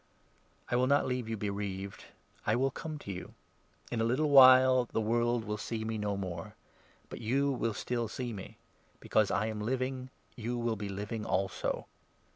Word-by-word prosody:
I - - +2
will 125 +1 +3
not 140 +1 +4
18 - - -2
leave 125 -3 -2
you 115 - -2
bereaved; 100 -1 -4 0.4
I 105 - +3
will 135 +2 +1
come 155 +3 -6
to 100 - -7
you. 90 -1 -8 0.6
In 115 - 0
a - - +3
little 135 +6 +1
while 130 -2 +8
the - - -27
19 110 - -1
world 120 -1 +1
will 105 0 -3
see 110 0 -3
me 110 -1 -2
no 105 -1 -1
more, 95 +2 -5 0.5
but - - -8
you 135 +5 +1
will 115 -4 -1
still 120 -2 -2
see 120 +2 -4
me; 95 -3 -9 0.4
because 110 -2 +2
I - - +1
am 110 -1 -3
living, 130 +2 -2 0.3
you 120 +1 -3
will 120 -1 0
be 105 -1 -5
living 105 +3 -4
also. 95 -2 -1
115 Hz, 190 wpm, -31 LUFS, 105-130 Hz, 0.6 s, while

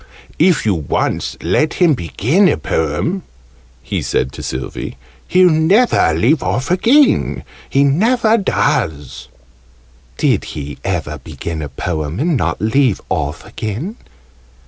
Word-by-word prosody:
"If 170 -3 +3
you 105 - +3
once 80 -6 -2
let 95 - +1
him 175 -4 +4
begin 135 - +1
a - - +1
Poem," 80 - -1 0.6
he - - -3
said 65 - -1
to - - -9
Sylvie, 65 +1 -5 0.3
"he'll 185 0 +5
never 160 - +3
leave 130 - +2
off 130 +7 -2
again! 260 +10 +3 0.3
He 140 - +3
never 220 - +3
does!" 75 - -1 0.9
"Did - - +1
he 70 -1 -6
ever 80 -6 -3
begin 80 +4 -6
a 75 - -5
Poem 80 +3 -4
and 165 +2 +1
not 85 - -1
leave 110 +2 +2
off 75 -1 -2
again?" 120 - -5
120 Hz, 125 wpm, -17 LUFS, -, 0.9 s, he'll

